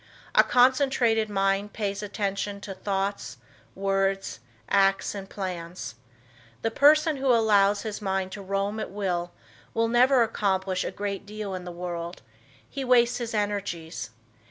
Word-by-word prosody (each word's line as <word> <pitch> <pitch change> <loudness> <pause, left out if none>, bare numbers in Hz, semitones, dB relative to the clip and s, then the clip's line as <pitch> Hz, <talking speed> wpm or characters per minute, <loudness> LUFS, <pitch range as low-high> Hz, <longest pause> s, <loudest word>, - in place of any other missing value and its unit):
A - - +7
concentrated 245 -3 +3
mind 195 0 0
pays 200 -2 -2
attention 200 0 -3
to 200 - -6
thoughts, 195 -8 -3 0.4
words, 195 - 0 0.3
acts 195 -1 +2
and 195 -1 -7
plans. 180 - -5 0.7
The 225 - +1
person 305 +4 +5
who 270 0 -2
allows 210 -4 +4
his 215 -1 -5
mind 190 -1 -1
to 205 - -7
roam 200 +2 -2
at 215 - -4
will 180 -3 -2 0.4
will 230 0 +2
never 245 +2 +5
accomplish 190 -4 0
a - - -2
great 200 0 -4
deal 210 -1 -5
in 180 -1 -5
the 180 - -6
world. 175 0 -6 0.4
He 275 - -5
wastes 245 -1 +4
his 235 -2 -4
energies. 200 - -3
200 Hz, 140 wpm, -26 LUFS, 195-225 Hz, 0.7 s, A